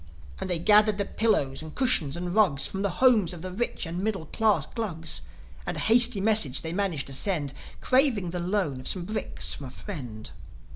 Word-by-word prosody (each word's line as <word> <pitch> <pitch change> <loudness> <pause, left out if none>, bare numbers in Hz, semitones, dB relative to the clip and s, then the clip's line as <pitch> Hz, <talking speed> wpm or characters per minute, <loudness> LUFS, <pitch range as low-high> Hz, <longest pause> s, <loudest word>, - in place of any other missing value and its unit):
And - - -4
they 175 - +1
gathered 210 +3 +4
the 200 - 0
pillows 195 -13 0
and 155 -1 -10
cushions 175 - +2
and 175 0 -4
rugs 185 -10 +3
From 195 - -3
the 200 - 0 0.2
homes 215 -9 +4
of 170 -1 -9
the 185 - -4
rich 220 0 -3
and 170 +2 -5
middle 195 -4 -2
class 215 +5 +1
Glugs. 170 -8 -1 0.4
And - - -4
a - - -3
hasty 230 -2 +4
message 200 -10 +2
they 165 0 -4
managed 180 -7 -1
to 135 - -6
send 145 -3 0 0.3
Craving 255 - +2
the 180 - -3
loan 175 -6 -1
of 130 - -6
some 180 -3 -1
bricks 215 +3 -1
from 140 - -8
a - - -8
friend. 125 - -8
185 Hz, 200 wpm, -26 LUFS, 160-215 Hz, 0.4 s, gathered